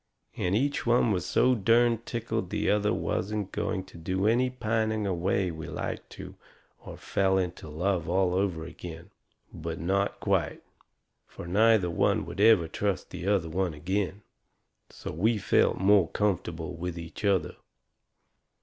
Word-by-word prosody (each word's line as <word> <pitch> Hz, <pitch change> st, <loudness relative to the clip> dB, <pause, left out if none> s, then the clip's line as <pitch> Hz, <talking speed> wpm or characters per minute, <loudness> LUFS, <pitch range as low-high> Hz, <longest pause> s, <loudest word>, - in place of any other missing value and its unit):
And 90 Hz, +2 st, 0 dB
each 140 Hz, +6 st, 0 dB
one 120 Hz, -1 st, +4 dB
was 90 Hz, -3 st, -1 dB
so 130 Hz, -, +3 dB
derned 115 Hz, +1 st, +2 dB
tickled 115 Hz, -5 st, -3 dB
the -, -, 0 dB
other 105 Hz, 0 st, +2 dB
one 85 Hz, -, -2 dB
wasn't 100 Hz, +3 st, -2 dB
going 95 Hz, -, -2 dB
to 95 Hz, -2 st, -14 dB
do 95 Hz, +4 st, -1 dB
any 120 Hz, +4 st, +3 dB
pining 110 Hz, -3 st, -1 dB
away 90 Hz, 0 st, 0 dB
we 80 Hz, -1 st, -7 dB
like -, -, -5 dB
to -, -, -9 dB, 0.5 s
of -, -, -9 dB
fell 95 Hz, -1 st, +1 dB
into 90 Hz, -4 st, -3 dB
love 85 Hz, +2 st, -1 dB
all 90 Hz, 0 st, +2 dB
over 90 Hz, -4 st, -1 dB
agin. 85 Hz, +3 st, -9 dB, 0.4 s
But 85 Hz, 0 st, -5 dB
not 100 Hz, +5 st, 0 dB
quite. -, -, 0 dB, 0.6 s
Fur -, -, -10 dB
neither 100 Hz, 0 st, +3 dB
one -, -, +1 dB
would 100 Hz, -, -5 dB
ever 105 Hz, -6 st, +6 dB
trust 100 Hz, +3 st, -2 dB
the 90 Hz, -, -6 dB
other 100 Hz, -5 st, +2 dB
one 90 Hz, 0 st, -1 dB
agin. 95 Hz, +5 st, -2 dB, 0.7 s
So -, -, -7 dB
we 110 Hz, +8 st, +1 dB
felt 100 Hz, -, +2 dB
more 95 Hz, -2 st, +4 dB
comfortable 85 Hz, -5 st, -2 dB
with 90 Hz, 0 st, -5 dB
each 85 Hz, +2 st, -8 dB
other. 100 Hz, -3 st, +1 dB
95 Hz, 155 wpm, -28 LUFS, 85-105 Hz, 0.7 s, ever